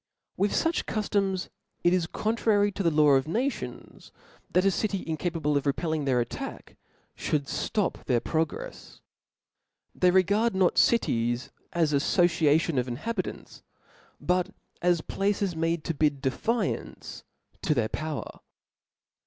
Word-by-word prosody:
With 200 Hz, +1 st, +1 dB
fuch 330 Hz, 0 st, +1 dB
cuftoms, 195 Hz, -3 st, -1 dB, 0.3 s
it 175 Hz, -, +4 dB
is 180 Hz, -3 st, +1 dB
contrary 210 Hz, 0 st, +1 dB
to 200 Hz, -, -4 dB
the 170 Hz, -, +3 dB
law 150 Hz, -1 st, +4 dB
of 135 Hz, +1 st, +3 dB
nations, 245 Hz, -, -4 dB, 0.4 s
that 180 Hz, +1 st, +2 dB
a 195 Hz, -, +5 dB
city 195 Hz, 0 st, -1 dB
incapable 160 Hz, -2 st, -1 dB
of 145 Hz, 0 st, 0 dB
repelling 155 Hz, +1 st, -1 dB
their 130 Hz, -3 st, +2 dB
attack, 120 Hz, -, -5 dB, 0.4 s
fhould 145 Hz, -2 st, -1 dB
flop 210 Hz, -4 st, -2 dB
their 125 Hz, -3 st, +2 dB
progrefs. 165 Hz, -, -4 dB, 0.9 s
They 180 Hz, -, +3 dB
regard 200 Hz, +4 st, +3 dB
no: 185 Hz, -2 st, +4 dB
cities 120 Hz, -, +2 dB, 0.2 s
as 160 Hz, -3 st, +1 dB
an 140 Hz, -, +4 dB
aflbciatioa 160 Hz, -2 st, +3 dB
of 125 Hz, -, -1 dB
inhabitants, 185 Hz, -, -4 dB, 0.6 s
but 180 Hz, 0 st, +1 dB, 0.3 s
as 175 Hz, -2 st, +3 dB
places 195 Hz, -1 st, -1 dB
made 165 Hz, 0 st, 0 dB
to 165 Hz, -, -2 dB
bid 145 Hz, -2 st, +1 dB
defiance 220 Hz, -, -2 dB, 0.4 s
to 150 Hz, -, +1 dB
their 110 Hz, -4 st, +1 dB
power. 155 Hz, -2 st, -5 dB
170 Hz, 130 wpm, -27 LUFS, 150-195 Hz, 0.9 s, a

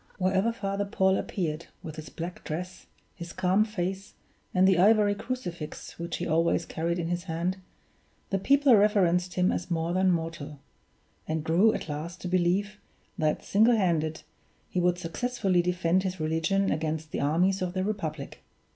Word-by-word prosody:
Wherever 190 Hz, +4 st, +2 dB
Father 200 Hz, -3 st, -2 dB
Paul 190 Hz, -1 st, +2 dB
appeared, 165 Hz, -5 st, -3 dB, 0.2 s
with 155 Hz, -1 st, -7 dB
his 155 Hz, -2 st, -8 dB
black 170 Hz, +4 st, -7 dB
dress, 180 Hz, +4 st, -6 dB, 0.3 s
his 170 Hz, -2 st, -8 dB
calm 185 Hz, +3 st, +2 dB
face, 195 Hz, -2 st, -4 dB, 0.4 s
and 185 Hz, 0 st, +4 dB
the 190 Hz, -3 st, +4 dB
ivory 210 Hz, +1 st, +5 dB
crucifix 200 Hz, -11 st, -6 dB
which 170 Hz, 0 st, -3 dB
he 175 Hz, -, -3 dB
always 165 Hz, +1 st, +1 dB
carried 170 Hz, +2 st, -2 dB
in 170 Hz, -1 st, -2 dB
his 175 Hz, +1 st, -2 dB
hand, 175 Hz, +2 st, -2 dB, 0.7 s
the 195 Hz, -, +1 dB
people 275 Hz, +3 st, +5 dB
reverenced 185 Hz, -4 st, +3 dB
him 180 Hz, 0 st, +3 dB
as 180 Hz, -, -3 dB
more 165 Hz, 0 st, -1 dB
than 185 Hz, +1 st, +3 dB
mortal; 160 Hz, -4 st, -3 dB, 0.7 s
and 155 Hz, -1 st, -2 dB
grew 175 Hz, +8 st, +4 dB
at -, -, -5 dB
last 160 Hz, +4 st, -5 dB
to -, -, -4 dB
believe, 185 Hz, +4 st, +1 dB, 0.4 s
that, 155 Hz, -1 st, 0 dB
single 225 Hz, +4 st, +4 dB
handed, 160 Hz, -6 st, 0 dB, 0.5 s
he 180 Hz, -, 0 dB
would 175 Hz, 0 st, +2 dB
successfully 190 Hz, +1 st, 0 dB
defend 180 Hz, 0 st, +1 dB
his 185 Hz, -1 st, -3 dB
religion 165 Hz, +5 st, +1 dB
against 155 Hz, 0 st, -2 dB
the -, -, -2 dB
armies 180 Hz, +7 st, +2 dB
of 180 Hz, -1 st, -2 dB
the 185 Hz, -1 st, -1 dB
Republic. 160 Hz, -9 st, -4 dB
180 Hz, 165 wpm, -28 LUFS, 165-195 Hz, 0.7 s, ivory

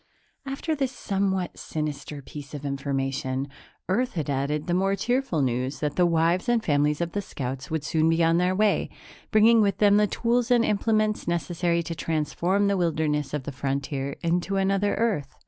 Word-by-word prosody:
After 275 Hz, +4 st, -2 dB
this 270 Hz, -4 st, -1 dB
somewhat 195 Hz, -6 st, -2 dB
sinister 150 Hz, -2 st, -5 dB
piece 145 Hz, +2 st, -9 dB
of 145 Hz, 0 st, -7 dB
information, 135 Hz, -1 st, -2 dB, 0.4 s
Earth 245 Hz, +7 st, 0 dB
had 155 Hz, -4 st, -2 dB
added 140 Hz, +2 st, -1 dB
the 175 Hz, -, -1 dB
more 195 Hz, +2 st, +2 dB
cheerful 240 Hz, -, 0 dB
news 130 Hz, +2 st, -1 dB
that 150 Hz, -2 st, -2 dB
the 180 Hz, -1 st, +4 dB
wives 170 Hz, +5 st, +1 dB
and 235 Hz, -2 st, +2 dB
families 150 Hz, +1 st, +2 dB
of 170 Hz, 0 st, -1 dB
the 205 Hz, -, -2 dB
scouts 135 Hz, -5 st, -5 dB
would 160 Hz, -2 st, -2 dB
soon 160 Hz, +1 st, +2 dB
be 165 Hz, +1 st, +2 dB
on 165 Hz, +1 st, +3 dB
their 180 Hz, +1 st, +1 dB
way, 210 Hz, +1 st, +2 dB, 0.4 s
bringing 225 Hz, +1 st, +5 dB
with 200 Hz, -1 st, +1 dB
them 205 Hz, -1 st, +5 dB
the 210 Hz, 0 st, +4 dB
tools 240 Hz, +3 st, 0 dB
and 240 Hz, -2 st, +4 dB
implements 215 Hz, 0 st, +1 dB
necessary 170 Hz, +1 st, 0 dB
to 165 Hz, -, -4 dB
transform 165 Hz, +5 st, 0 dB
the 200 Hz, -1 st, +2 dB
wilderness 155 Hz, -4 st, 0 dB
of 150 Hz, -2 st, -3 dB
the 145 Hz, -, -5 dB
frontier 140 Hz, +1 st, -3 dB
into 175 Hz, +3 st, 0 dB
another 195 Hz, +1 st, +1 dB
Earth. 205 Hz, -, -1 dB
170 Hz, 180 wpm, -26 LUFS, 145-200 Hz, 0.4 s, bringing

